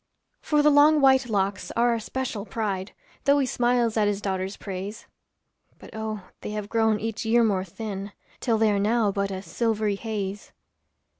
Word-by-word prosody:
For 300 -1 +2
the 300 - +6
long 295 +2 +6
white 265 -2 +4
locks 200 -1 -1
are 240 +1 +4
our 230 - 0
special 235 -2 -4
pride, 200 -2 -3 0.3
Though 280 +1 +5
he 280 - +2
smiles 240 -2 +1
at 210 -1 +3
his 205 -1 0
daughter's 190 -1 -3
praise; 195 +2 -6 0.7
But, - - -13
oh, 220 -1 -4 0.2
they - - -5
have 210 -1 -5
grown 220 -2 +2
each 225 +1 -3
year 235 +1 +4
more 200 -4 +1
thin, 200 +1 -6 0.3
Till 230 -3 +1
they 220 -1 +3
are 200 - +1
now 215 0 +2
but 200 0 -1
a 190 -1 -5
silvery 220 -2 0
haze. 205 -2 -5
220 Hz, 175 wpm, -25 LUFS, 200-235 Hz, 0.7 s, the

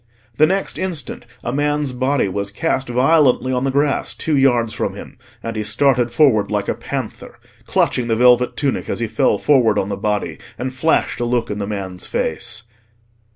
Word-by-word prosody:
The 155 - +5
next 195 +1 -1
instant 165 -10 -4 0.2
a 120 - -3
man's 145 -1 0
body 130 0 0
was 100 +1 -2
cast 135 +4 -1
violently 130 0 +3
on 125 +1 0
the - - +1
grass 140 +1 0
two 160 -2 -1
yards 120 -4 +2
from - - -3
him, - - -10 0.3
and 115 0 -4
he 110 - -2
started 120 +3 +2
forward 125 -8 +3
like 105 -1 -1
a - - +1
panther, - - -6 0.3
clutching 125 -2 +1
the 115 - +1
velvet 125 +1 +4
tunic 140 -2 -1
as - - -2
he 120 - 0
fell 110 -1 +1
forward 115 -5 +3
on 95 - 0
the 100 - -2
body 105 0 -2 0.2
and 130 +1 -4
flashed 160 +5 +1
a 120 - 0
look 120 -2 -1
in 105 - -4
the 100 - -3
man's 95 -3 -5
face. 110 0 -2
125 Hz, 190 wpm, -19 LUFS, 110-140 Hz, 0.3 s, The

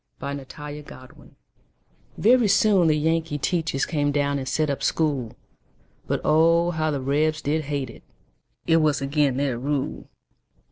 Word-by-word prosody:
Y 140 0 -4
Z 140 -1 -7
Learning 150 0 -8
to 130 0 -12
Read - - -19 0.8
VERY 240 +1 +4
soon 195 -3 +4
the 155 -1 +3
Yankee 160 0 0
teachers 160 -2 -1
Came 145 -3 0
down 140 -1 0
and 130 - -6
set 155 -2 0
up 140 - -4
school; 140 -8 -1 0.7
But, - - -1
oh! 165 +2 +4
how 155 -2 -1
the 145 -2 -1
Rebs 155 +4 0
did 155 +1 -1
hate 140 -4 -3
it, - - -15 0.6
It 165 - +4
was 150 -3 +1
agin' 140 -2 +1
their 135 -4 -1
rule. 140 +1 -3
150 Hz, 160 wpm, -24 LUFS, 140-160 Hz, 0.8 s, VERY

